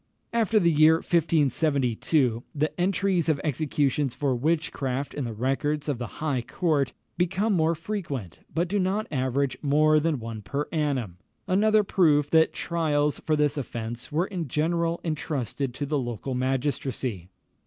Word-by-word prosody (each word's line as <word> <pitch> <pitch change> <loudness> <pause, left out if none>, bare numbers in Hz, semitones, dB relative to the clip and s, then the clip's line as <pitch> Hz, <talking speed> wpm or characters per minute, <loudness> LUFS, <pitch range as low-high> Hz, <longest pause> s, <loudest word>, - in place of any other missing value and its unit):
After 225 -2 +3
the 170 -3 +3
year 155 +1 +6
1572, 145 -6 +1
the 155 +4 -1
entries 185 -2 +1
of 150 -3 +2
executions 145 -2 0
for 140 -3 0
witchcraft 140 -2 -1
in 145 - -3
the 115 - -4
records 135 +6 -1
of 140 -5 -1
the 120 -6 -6
High 140 -5 0
Court 145 -1 0 0.3
become 190 +5 +1
more 165 -2 +2
frequent, 160 - -5
but 170 +2 0
do 200 +3 0
not 195 +3 0
average 130 -1 0
more 155 +1 +4
than 155 -3 0
one 115 -1 -6
per 140 +10 -3
annum, 135 - -1 0.3
another 210 +3 +4
proof 150 -7 +3
that 160 0 +5
trials 150 -3 0
for 155 - +3
this 150 -1 +1
offence 120 -2 -5
were 165 +4 +1
in 180 -6 -4
general 165 +4 0
entrusted 145 - -2
to 145 - -3
the 145 0 0
local 120 +1 -4
magistracy. 130 - -2
150 Hz, 150 wpm, -26 LUFS, 130-165 Hz, 0.3 s, year